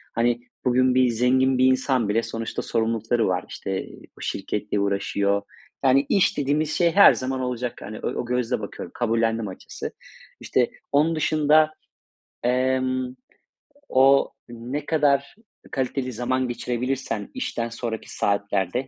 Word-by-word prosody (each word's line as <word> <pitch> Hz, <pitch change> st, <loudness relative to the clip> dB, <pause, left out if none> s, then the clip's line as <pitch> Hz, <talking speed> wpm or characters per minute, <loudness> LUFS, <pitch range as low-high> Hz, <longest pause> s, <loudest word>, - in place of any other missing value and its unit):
Hani, 120 Hz, +1 st, +1 dB, 0.2 s
bugün 130 Hz, 0 st, +3 dB
bir 130 Hz, -1 st, +4 dB
zengin 130 Hz, +3 st, +2 dB
bir 130 Hz, -, +4 dB
insan 130 Hz, -3 st, +2 dB
bile 115 Hz, +3 st, +2 dB
sonuçta 115 Hz, 0 st, -4 dB
sorumluluklar 115 Hz, 0 st, 0 dB
var; 90 Hz, -5 st, +1 dB
işte, 95 Hz, 0 st, -4 dB
ııı, -, -, -13 dB, 0.2 s
şirketle 105 Hz, -, -2 dB
uğraşıyor. 100 Hz, 0 st, 0 dB, 0.4 s
Yani 135 Hz, +1 st, +4 dB
iş 195 Hz, -, +3 dB
dediğimiz 145 Hz, +2 st, 0 dB
şey 170 Hz, -1 st, +3 dB
her 200 Hz, +4 st, +8 dB
zaman 130 Hz, 0 st, -3 dB
olacak. 125 Hz, -1 st, -3 dB
Hani 105 Hz, +2 st, -7 dB
o -, -, -3 dB
o -, -, -3 dB
gözle 125 Hz, 0 st, -1 dB
bakıyorum, 100 Hz, -4 st, -7 dB
kabullendim 115 Hz, -2 st, 0 dB
açıkçası. 95 Hz, -, -7 dB, 0.5 s
İşte -, -, +1 dB, 0.2 s
onun 155 Hz, +3 st, +3 dB
dışında, 155 Hz, 0 st, +3 dB, 0.7 s
emm, 130 Hz, 0 st, 0 dB, 0.8 s
o 135 Hz, +1 st, +5 dB, 0.2 s
ne 125 Hz, +5 st, -5 dB
kadar 145 Hz, -3 st, +1 dB, 0.4 s
kaliteli 130 Hz, -1 st, -2 dB
zaman 130 Hz, +2 st, -1 dB
geçirebilirsen 120 Hz, -2 st, -3 dB
işten 115 Hz, 0 st, -3 dB
sonraki 115 Hz, -1 st, -5 dB
saatlerde, 100 Hz, +4 st, 0 dB
125 Hz, 130 wpm, -24 LUFS, 115-130 Hz, 0.8 s, her